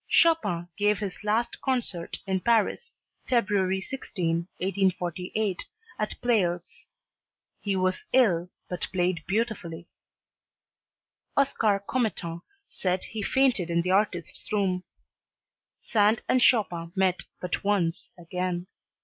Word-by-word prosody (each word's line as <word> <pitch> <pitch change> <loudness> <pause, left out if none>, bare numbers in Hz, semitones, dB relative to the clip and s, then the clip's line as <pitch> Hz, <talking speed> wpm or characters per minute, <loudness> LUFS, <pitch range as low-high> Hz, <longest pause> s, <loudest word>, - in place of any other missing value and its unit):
Chopin 315 - +3
gave 205 0 +3
his 200 -3 -5
last 220 +3 0
concert 240 -10 -2
in 190 -1 0
Paris, 235 - +1 0.3
February 200 -6 +2
16, 170 -7 -2
1848, 185 +1 0 0.4
at 215 - -2
Pleyel's. 180 -8 0 0.7
He 200 -2 0
was 185 0 +1
ill 180 -9 +4 0.2
but 180 - -3
played 180 -2 0
beautifully. 195 -6 -2 1.5
Oscar 220 -8 +2
Commettant 190 -9 -1 0.3
said 185 -1 -1
he 220 - -5
fainted 240 -6 +2
in 170 0 +2
the 180 - 0
artist's 185 -4 0
room. 190 -3 +1 1.0
Sand 215 0 +3
and 255 - +3
Chopin 175 -9 +3
met 190 -1 +2
but 180 - -3
once 190 -5 0
again. 180 +1 -3
190 Hz, 105 wpm, -27 LUFS, 175-220 Hz, 1.5 s, ill